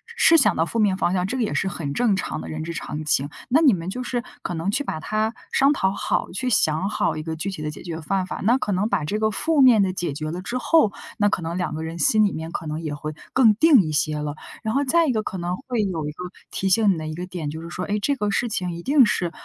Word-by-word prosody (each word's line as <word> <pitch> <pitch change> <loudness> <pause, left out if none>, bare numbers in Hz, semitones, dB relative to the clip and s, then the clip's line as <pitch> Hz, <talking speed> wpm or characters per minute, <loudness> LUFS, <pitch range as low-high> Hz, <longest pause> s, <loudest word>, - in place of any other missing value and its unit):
是 330 - +6
想 270 - +4
到 165 - +1
负 230 - -3
面 200 -3 +3
方 180 - +1
向， 180 -1 +1
这 260 - -3
个 245 - +1
也 215 - -2
是 - - 0
很 165 -6 -4
正 235 -1 +2
常 190 - -3
的 - - -8
人 155 0 -4
之 170 +1 -5
常 155 -2 -5
情。 145 -1 +1 0.2
那 300 +6 +4
你 275 -7 +6
们 170 -1 -3
就 250 +6 -4
是 245 -1 -2 0.2
可 - - -4
能 165 +5 -1
去 270 +7 0
把 155 - -4
它 215 +6 -1 0.2
商 275 +1 +4
讨 190 -9 +1
好， 200 - -2
去 250 +8 -2
想 175 -3 +2
好 - - 0
一 155 - -4
个 160 0 -4
具 185 +5 -3
体 185 -5 -7
的 150 - -3
解 150 - -9
决 165 -2 -5
办法。 190 +3 -2
那 235 +6 +4
可 210 -5 -2
能 200 +3 0
把 - - 0
这 210 +8 -2
个 215 0 +2
负 295 +8 +1
面 245 -5 +7
的 185 -1 -1
解 175 -5 -3
决 155 +2 -4
了 175 +2 -5
之 240 +6 -3
后， 280 -3 +3 0.3
那 205 0 +3
可 185 - -1
能 165 +1 -3
两 180 - -2
个 160 - -4
人 165 +1 -6
心 215 +8 +4
里 200 - +1
面 160 +1 -6
可 170 - -5
能 155 +1 -4
也 155 -3 -4
会 150 +1 -5 0.2
更 225 -5 +5
定 285 0 +6
一 155 -4 -3
些 155 0 0
了。 150 0 -4 0.3
然 220 - -2
后 280 - +2
再 330 +5 +3
一 265 - +2
个 220 -2 -1
可 190 - -5
能 175 +1 -2
会 250 -4 -2
有 165 -6 -2
一 150 - -3
个 180 +4 -8 0.3
提 190 - -1
醒 205 +1 +4
你 - - -4
的 155 -1 -5
一 155 - -5
个 175 +2 -5
点， 175 -5 -5
就 160 +2 -6
是 170 - -8
说， 180 +1 -4
哎， 205 - -1
这 280 +7 0
个 210 -6 -1
事 220 +4 0
情 180 -4 -2
一 170 0 -7
定 275 -1 +5
是， 180 -5 0
190 Hz, 325 characters per minute, -23 LUFS, 160-225 Hz, 0.3 s, 面